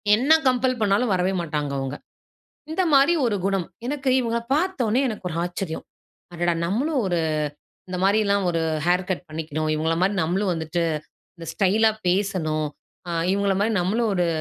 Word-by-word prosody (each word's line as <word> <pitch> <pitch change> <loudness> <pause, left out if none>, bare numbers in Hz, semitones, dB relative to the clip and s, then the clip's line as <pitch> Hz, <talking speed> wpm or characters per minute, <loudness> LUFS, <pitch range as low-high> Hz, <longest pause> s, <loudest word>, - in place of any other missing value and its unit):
என்ன 270 +8 +4
கம்பெல் 255 0 +2
பண்ணாலும் 210 +2 +2
வரவே 185 +1 +1
மாட்டாங்க 150 -3 -3
அவங்க. 135 +1 -3 0.8
இந்த 370 +4 +1
மாரி 280 +5 +5
ஒரு 210 -3 +1
குணம். 195 -3 0 0.2
எனக்கு 270 -1 -1
இவங்கள 235 -1 -1
பார்த்தோனே, 270 - +1
எனக்கு 210 -4 -6
ஒரு 160 - -5
ஆச்சரியம். 175 -2 -4 0.5
அடடா! 175 0 0
நம்மளும் 265 - 0
ஒரு 175 -2 0 0.7
இந்த 180 - -3
மாரி 200 +3 +4
எல்லாம் 200 -1 +1
ஒரு 165 -1 0 0.3
ஹேர் 180 +1 +2
கட் 180 0 -3
பண்ணிக்கணும். 155 0 -3
இவங்கள 160 +1 0
மாதிரி 200 +2 +2
நம்மளும் 185 +3 0
வந்துட்டு 165 +1 -2 0.5
இந்த 165 - -9
ஸ்டைலா 215 +3 +3 0.2
பேசணும். 175 -6 0 0.4
ஆ, - - -5 0.2
இவங்கள 200 -1 +1
மாரி 220 +1 +1
நம்மளும் 215 +4 +1
ஒரு 175 -1 +2
195 Hz, 160 wpm, -24 LUFS, 170-230 Hz, 0.8 s, மாரி